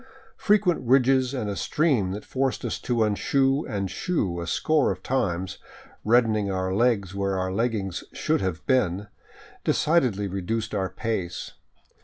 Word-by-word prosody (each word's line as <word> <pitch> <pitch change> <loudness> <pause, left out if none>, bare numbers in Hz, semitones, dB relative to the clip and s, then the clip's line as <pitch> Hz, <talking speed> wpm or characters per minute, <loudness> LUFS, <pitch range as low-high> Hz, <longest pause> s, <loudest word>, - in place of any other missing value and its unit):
Frequent 205 -4 +2
ridges 130 0 +3
and 125 -6 -3
a 100 - -2
stream 135 - +1
that 100 +3 -5
forced 135 0 -1
us - - -2
to 120 -2 0
unshoe 135 +7 +1
and 100 -3 -3
shoe 95 - -1
a 85 - -5
score 150 - +2
of 95 -1 -6
times, 95 -8 -1 0.4
reddening 110 -3 +3
our 95 -1 -1
legs 100 -4 +1
where 100 -1 -1
our 95 0 -1
leggings 105 -4 -1
should - - 0
have 95 -4 -3
been, 105 -6 +1 0.5
decidedly 125 - +2
reduced 100 +4 -3
our 95 -1 -1
pace. 105 -7 -3
110 Hz, 145 wpm, -25 LUFS, 95-130 Hz, 0.5 s, ridges